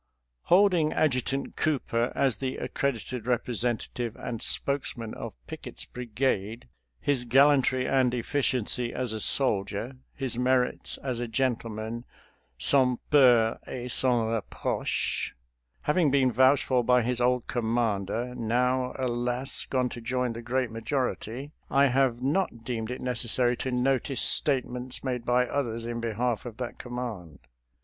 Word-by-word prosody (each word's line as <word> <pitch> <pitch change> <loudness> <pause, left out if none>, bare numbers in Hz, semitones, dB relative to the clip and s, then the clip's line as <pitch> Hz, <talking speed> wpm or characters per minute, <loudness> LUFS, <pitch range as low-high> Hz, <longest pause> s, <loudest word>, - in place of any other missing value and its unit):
Holding 180 -4 +4
Adjutant 135 -2 0
Cooper 120 -5 0
as 130 -6 +1
the 130 +2 -3
accredited 125 -3 -3
representative 120 -1 -2
and 115 -2 -6
spokesman 130 -5 0
of - - -7
Pickett's - - -7
bri 125 0 -8
gade 115 -1 -1 0.2
— - - -29
^his 125 -4 +1
gallantry 135 -1 +4
and 130 -2 +3
efficiency 125 -1 -1
as 125 -3 -2
a 110 - -3
soldier, 110 +1 +2 0.2
his 130 -4 -2
merits 125 0 +1
as 130 -3 -2
a 120 - -3
gentleman, 115 -1 -2 0.5
sans 125 - +5
peur 120 -6 +5
et 125 -1 -5
sans 120 -3 +3
re 115 -1 0
proche, - - -2 0.5
having 150 0 +2
been 130 -2 +3
vouched 130 +4 +4
for 125 -2 +1
by 125 0 +4
his 125 +1 -1
old 125 0 +2
com 115 -2 -2
mander, 115 +1 -1
now, 125 +2 0
alas, 125 +1 -1
gone 125 -2 0
to 120 - -8
join 125 0 -1
the 115 - -7
great 125 0 -1
majority 125 +2 -3
— - - -44
I 140 0 +4
have 125 -1 +1
not 140 -5 0
deemed 115 -2 -3
it 125 - -5
necessary 125 0 +1
to 130 - -3
notice 130 +1 0
statements 125 -2 0
made 125 -3 -3
by 125 +1 +3
others 115 -4 -2
in 120 0 -4
behalf 115 +1 -1
of 115 - -9
that 125 -2 -6
command. 120 -10 -6
125 Hz, 145 wpm, -27 LUFS, 115-130 Hz, 0.5 s, sans